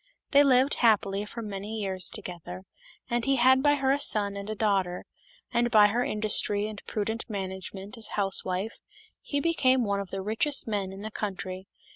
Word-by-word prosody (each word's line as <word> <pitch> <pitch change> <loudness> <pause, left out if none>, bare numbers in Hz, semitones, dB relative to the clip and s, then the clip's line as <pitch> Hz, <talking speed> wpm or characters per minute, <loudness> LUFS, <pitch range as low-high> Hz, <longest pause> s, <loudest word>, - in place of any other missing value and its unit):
They 285 0 +6
lived 265 0 +3
happy 205 -3 +2
for 230 +2 -7
many 210 +1 -6
years 190 -3 +1
together, 180 -2 -8 0.4
and 240 -1 -1
he 275 +2 +2
had 260 +1 +4
by 290 +1 +3
her 270 -1 +1
a 280 - +1
son 205 -7 +4
and 200 +1 -7
a 215 - -3
daughter; 195 -4 -1 0.5
and 240 0 +1
by 210 -3 +6
her 240 +4 0
industry 210 -1 +2
and 215 -1 -9
prudent 220 +3 -3
management 195 +2 -6
as 220 - +1
a - - -9
housewife 195 +1 0 0.4
he 285 - -2
became 265 -5 +2
one 200 -2 -1
of 200 -2 -6
the 195 +1 -5
richest 225 +8 0
men 200 -3 -2
in 195 +1 -9
the 220 - -6
country. 190 -2 -5
210 Hz, 185 wpm, -27 LUFS, 195-240 Hz, 0.5 s, They